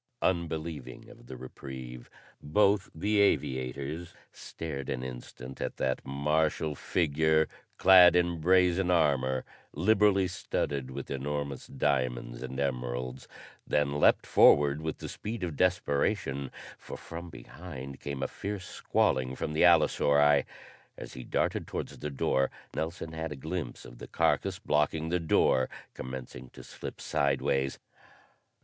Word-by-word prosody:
Unbelieving 80 -6 -2
of - - -16
the 65 - -8
reprieve, 65 -1 -9 0.3
both 100 +5 +2
the 100 +5 +1
aviators 70 -1 0 0.2
stared 70 -5 -6
an 65 -1 -2
instant 65 +1 -8
at - - -3
that 65 -1 -1
martial 75 +2 0
figure 80 0 +1 0.3
clad 90 -2 +8
in 85 -2 +1
brazen 90 +1 +3
armor 70 -6 +2 0.3
liberally 100 +2 +3
studded 70 -7 -3
with 65 - -7
enormous 70 0 -3
diamonds 65 -4 -1
and 65 - -5
emeralds, 65 -1 -3 0.4
then 75 0 +1
leaped - - +4
forward 70 +1 +5
with 80 0 -3
the - - -7
speed 110 -1 -5
of 85 -4 -3
desperation, 70 -4 0 0.3
for - - -8
from 85 +1 -8
behind 70 -6 -9
came 70 -2 -4
a - - 0
fierce 100 -2 -5
squalling 65 0 0
from 75 - -3
the 75 - 0
allosauri. 75 -4 +5 0.5
As - - -9
he 65 - -8
darted - - -1
towards - - -5
the 75 - -4
door 65 -1 +1 0.3
Nelson 80 0 -4
had 80 0 -4
a - - -4
glimpse 80 -1 -5
of - - -12
the - - -8
carcass 95 -1 +1
blocking 80 -4 0
the 90 +1 +1
door 65 -5 +3 0.2
commencing 65 -1 -7
to - - -11
slip - - -8
sidewise. 70 -1 0
75 Hz, 130 wpm, -29 LUFS, 65-85 Hz, 0.5 s, clad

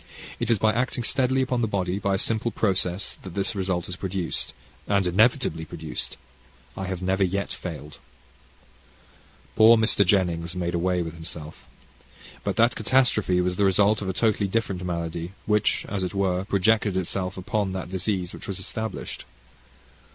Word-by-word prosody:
It - - -1
is 115 - +4
by 110 +2 +3
acting 125 +1 -1
steadily 130 +2 +2
upon 125 -2 -1
the 115 - +1
body, 95 -2 -1
by 100 0 +1
a - - +1
simple 110 +3 +1
process, 95 -4 -1
that 95 -3 -9
this 100 +1 -1
result 95 -3 -1
is 90 - -4
produced 95 -2 -2 0.4
and 100 -2 +2
inevitably 100 - +2
produced 80 -6 -5 0.6
I 95 - -4
have 95 -1 -4
never 95 +1 +2
yet 100 +2 -1
failed. 75 -4 -7 1.6
Poor 115 +1 +8
Mr. 110 -2 +4
Jennings 90 -3 +1
made 85 -1 -2
away 90 +1 +1
with 80 -1 -6
himself. 80 -2 -9 0.8
But - - -1
that 115 +2 +4
catastrophe 110 -10 +2
was 90 0 -1
the 100 - +3
result 100 +3 +3
of 95 - -3
a - - +2
totally 105 -1 +1
different 95 -3 -1
malady, 85 0 -3
which, 105 -1 +2
as 100 -2 -2
it 90 +2 -3
were, 95 -1 0
projected 100 0 +2
itself 95 +1 -2
upon 95 +1 -1
the 95 -1 -3
disease 95 0 -2
which - - -8
was 100 - -4
established. 110 +4 -5
95 Hz, 165 wpm, -25 LUFS, 90-105 Hz, 1.6 s, Poor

